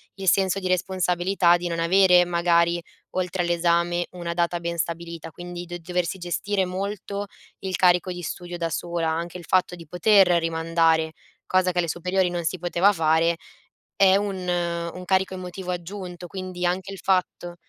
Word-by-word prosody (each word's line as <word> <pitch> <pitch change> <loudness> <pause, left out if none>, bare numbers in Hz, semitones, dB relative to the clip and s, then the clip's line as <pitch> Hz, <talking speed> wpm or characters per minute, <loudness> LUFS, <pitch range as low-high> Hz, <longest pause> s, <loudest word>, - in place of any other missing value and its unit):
il 195 -1 -6
senso 190 +1 +3
di 185 - -3
responsabilità 180 -1 +2
di 175 0 -2
non 170 -1 -3
avere 180 +1 +5
magari 170 0 +2 0.3
oltre 180 -1 -1
all'esame 175 0 +1
una 170 -1 -4
data 170 0 0
ben 170 0 -4
stabilita, 170 0 -4
quindi 175 +2 -8
d 175 0 -5
doversi 180 +2 -2
gestire 190 +2 -1
molto 200 +2 -4 0.3
il 190 -2 -3
carico 180 0 +3
di 175 0 -6
studio 175 +2 -5
da 165 -1 -2
sola, 170 0 -2
anche 170 +2 -3
il 175 - -11
fatto 185 -1 +2
di 165 -1 -12
poter 190 +3 +4
rimandare, 165 -1 +1 0.3
cosa 185 0 +2
che 180 - -8
alle 170 -1 +2
superiori 180 +3 0
non 175 -1 -3
si 185 +3 -1
poteva 175 +3 +3
fare, 165 -1 +2 0.6
è 190 -1 +6
un 200 -1 -1
un 170 0 -2
carico 190 0 +1
emotivo 180 0 -6
aggiunto, 180 0 -6
quindi 185 -1 -5
anche 190 +2 -1
il 190 - -9
fatto 180 -2 0
175 Hz, 165 wpm, -24 LUFS, 170-185 Hz, 0.6 s, è